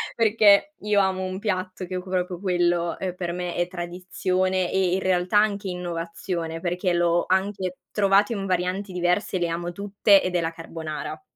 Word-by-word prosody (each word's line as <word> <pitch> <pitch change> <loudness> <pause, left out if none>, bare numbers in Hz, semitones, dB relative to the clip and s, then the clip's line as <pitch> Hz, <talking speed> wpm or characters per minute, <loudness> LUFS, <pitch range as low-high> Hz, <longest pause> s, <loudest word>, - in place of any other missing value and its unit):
perché 220 +4 +4
io 210 -1 +2
amo 190 -1 +1
un 185 0 -4
piatto 185 -3 -3
che 185 - -3
c - - -9
proprio 180 -1 -2
quello, 175 -2 +1
uhm, 185 -2 -3
per 175 -2 -3
me 180 0 -4
è 175 - 0
tradizione 185 +1 -1
e 190 -2 +2
in 190 - +1
realtà 185 +2 +2
anche 205 -2 0
innovazione, 170 -1 -4
perché 180 +1 -1
l'ho 175 0 +2
anche 190 -1 0
trovato 200 +2 +3
in 200 -3 -3
varianti 185 +1 -1
diverse, 180 +2 0
le 175 - +1
amo 170 +1 -3
tutte 200 +1 +3
ed 185 -1 -2
è 175 - +2
la 165 0 -1
carbonara 160 -2 -6
185 Hz, 175 wpm, -24 LUFS, 175-195 Hz, -, perché